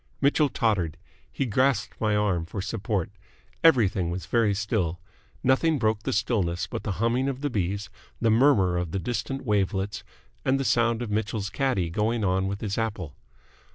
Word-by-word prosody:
Mitchell 145 +1 +3
tottered. 100 - 0 0.3
He 135 - -1
grasped 130 +3 +1
my 105 -2 +2
arm 95 -5 0
for 100 - -5
support. 100 -2 -2 0.5
Everything 105 - +4
was 90 -1 -4
very 105 +1 +2
still. 95 -5 -1 0.4
Nothing 150 +5 +3
broke 110 -3 +1
the - - -2
stillness 95 -5 0
but - - -5
the - - -3
humming 120 +6 +1
of 135 0 -5
the 145 -1 -1
bees, 100 -1 -2 0.3
the 115 -1 +2
murmur 110 -7 +4
of 90 -2 -3
the 95 - 0
distant 130 +5 -3
wavelets, 100 -2 0 0.4
and 135 +1 +2
the 135 - -1
sound 120 -1 +2
of 110 - -5
Mitchell's 105 -1 -2
caddie 120 -12 0
going 110 +4 0
on 95 0 +1
with 100 +1 -4
his 105 0 -2
apple. 100 -9 -3
105 Hz, 170 wpm, -26 LUFS, 95-120 Hz, 0.5 s, Everything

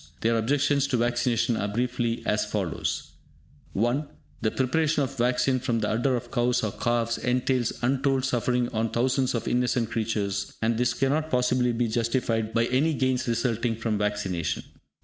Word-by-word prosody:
Their 115 +1 +2
objections 140 +4 +2
to 125 - 0
vaccination 120 0 +1
are 100 - -1
briefly 120 +1 -1
as 105 0 +1
follows: 95 -8 -3 0.6
(1) 120 +8 0 0.3
The 110 - +2
preparation 145 +5 +1
of 135 - -2
the 120 -2 +1
vaccine 130 +1 +2
from 120 -2 -1
the 105 - 0
udder 120 +4 +1
of 120 - -5
cows 120 -1 +1
or 110 - 0
calves 115 +1 0
entails 125 -1 +1
untold 135 +1 +1
suffering 125 -1 +1
on 115 -1 -1
thousands 130 +2 +1
of 115 - -3
innocent 125 -2 +1
creatures, 105 -3 -2
and 115 +1 +1
this 120 0 +1
cannot 145 +4 0
possibly 125 -1 +2
be 120 0 0
justified 115 -1 0
by 115 0 +2
any 145 +6 +1
gains 130 -2 0
resulting 115 -1 0
from 110 -2 -2
vaccination. 95 -6 -1
120 Hz, 165 wpm, -26 LUFS, 115-130 Hz, 0.6 s, Their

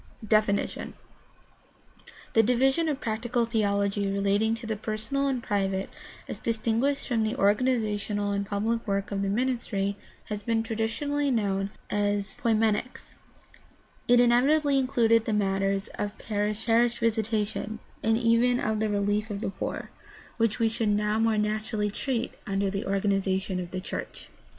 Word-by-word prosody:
DEFINITION 215 -2 +1 1.4
The 225 - +6
division 265 +8 +2
of 285 -3 -2
practical 235 +1 -1
theology 200 -3 0
relating 200 +3 +1
to 230 +1 -9
the 220 -1 -2
personal 220 +6 -2
and 255 -3 -1
private 195 -1 -1 0.4
as - - -6
distinguished 230 +5 0
from 235 -4 +1
the 220 +2 0
organizational 210 -2 +1
and 200 0 0
pubHc 220 +3 -1
work 200 0 -1
of 195 -1 -1
the 200 - 0
ministry 210 -3 -1 0.3
has 210 -1 -5
been 225 +1 0
traditionally 235 +6 -1
known 200 -5 0 0.2
as 205 -1 -1
poimenics. 225 +1 0 0.9
It 245 0 +6
inevitably 275 +4 +4
included 230 -4 +3
the 220 - -1
matters 195 -1 0
of 205 +1 -5
parish 210 0 -2
visitation, 225 -2 +1 0.2
and 225 0 +2
even 240 +1 +3
of 215 0 0
the 220 0 0
relief 205 +1 0
of 205 -1 -4
the 205 - -3
poor, 195 - -5 0.5
which 225 -2 +1
we 230 - +2
should 225 0 -1
PRACTICAL 205 0 +3
THEOLOGY 210 0 0
6ii - - +2
now 225 - +3
more 220 - +1
naturally 210 0 -1
treat 245 +2 -2
under 195 -1 0
the 200 +2 -3
organization 195 -1 0
of 175 -1 -5
the 185 - -4
church. 185 - -6
215 Hz, 150 wpm, -27 LUFS, 200-235 Hz, 1.4 s, The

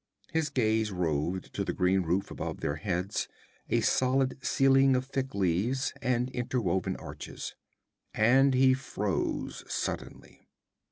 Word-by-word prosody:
His 160 -1 0
gaze 110 -5 +1
roved 85 0 -1
to 100 - -1
the - - -2
green 95 +1 +2
roof 90 +3 -1
above - - -4
their 70 - -1
heads, 90 +3 -2 0.4
a - - +2
solid 130 +1 +1
ceiling 135 0 +4
of 125 0 0
thick 135 -2 -3
leaves 100 +8 +1
and 125 0 0
interwoven 105 -7 -1
arches. - - -7 0.6
And 130 +5 +5
he 130 0 +5
froze 105 -7 -2
suddenly. - - -5
115 Hz, 125 wpm, -29 LUFS, 95-130 Hz, 0.6 s, And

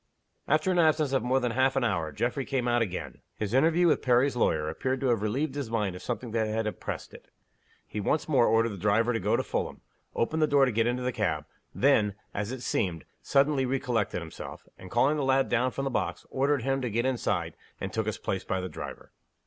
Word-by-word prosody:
After 155 +5 +2
an 180 - +2
absence 155 -3 +3
of 135 - +3
more 125 +3 +2
than 125 -2 -1
half 130 +3 +2
an 135 - +1
hour 85 -9 0
Geoffrey 120 - -1
came 130 -2 -1
out 120 0 +2
again. 95 -5 -4
His 105 0 -3
interview 165 +6 +4
with 165 - +3
Perry's 125 +2 +3
lawyer 80 -10 +1
appeared 130 +12 -2
to 135 - +1
have 115 -4 +2
relieved 130 +7 -1
his 140 -5 -4
mind 105 -5 -1
of 90 - -8
something 120 -1 -4
that 110 -1 0
had 110 +1 -1
oppressed 105 - -5
it. - - -13 0.6
He 105 - -5
once 150 +9 0
more 130 -6 +4
ordered 115 +1 +3
the 100 -3 -7
driver 110 +5 +2
to 115 - 0
go - - +1
to - - 0
Fulham - - -3 0.3
opened 155 +7 0
the 155 - +4
door 140 -2 +5
to 130 - 0
get 115 +1 +1
into 125 +1 -1
the 125 - 0
cab 80 -11 -1 0.3
then, 110 -7 +3 0.2
as 105 +3 -3
it 130 -1 -6
seemed, 85 -6 -1 0.2
suddenly 140 0 +2
recollected 125 -8 -1
himself 80 -1 -9
and, 95 - -12
calling 130 +8 +3
the 145 - 0
lad 135 0 +2
down 120 +2 +2
from 135 - -4
the 135 - -1
box, - - -2
ordered 135 -1 +1
him 135 +1 0
to 125 - -1
get 115 +3 0
inside, 130 -2 -1 0.2
and 95 -1 -5
took 110 -1 -1
his 110 - -2
place 95 -1 -3
by 95 - -1
the 90 - -3
driver. - - -8
120 Hz, 230 wpm, -28 LUFS, 105-135 Hz, 0.6 s, door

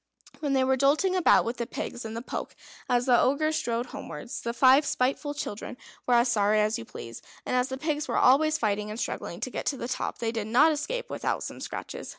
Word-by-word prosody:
When 290 -3 -1
they 265 -1 +3
were 260 0 +2
jolting 300 +8 +3
about 365 - +4
with 235 +2 -3
the 235 - -3
pigs 240 - -5
in 220 0 -5
the 230 - -5
poke - - -5 0.3
as 245 -1 +2
the 245 -2 +5
Ogre 310 +4 +2
strode 240 -6 -1
homewards, 150 +9 -7
the 235 - -2
five 260 +4 +5
spiteful 285 +2 -1
children 245 -2 -5 0.3
were 245 - +4
as 240 +1 +4
sorry 210 -1 +3
as 215 +1 +1
you - - -8
please; 115 0 -9 0.2
and - - -1
as 250 0 +2
the 265 - -4
pigs 300 +1 -2
were - - -1
always 310 +4 +4
fighting 210 -3 -1
and 215 +2 -6
struggling - - -4
to - - -3
get - - -5
to 275 - 0
the 240 - -4
top, 250 - -3
they 225 -1 -2
did 220 -2 -3
not 260 +8 +5
escape 465 +12 -3
without - - -2
some - - -7
scratches. - - -6
250 Hz, 230 wpm, -27 LUFS, 230-290 Hz, 0.3 s, the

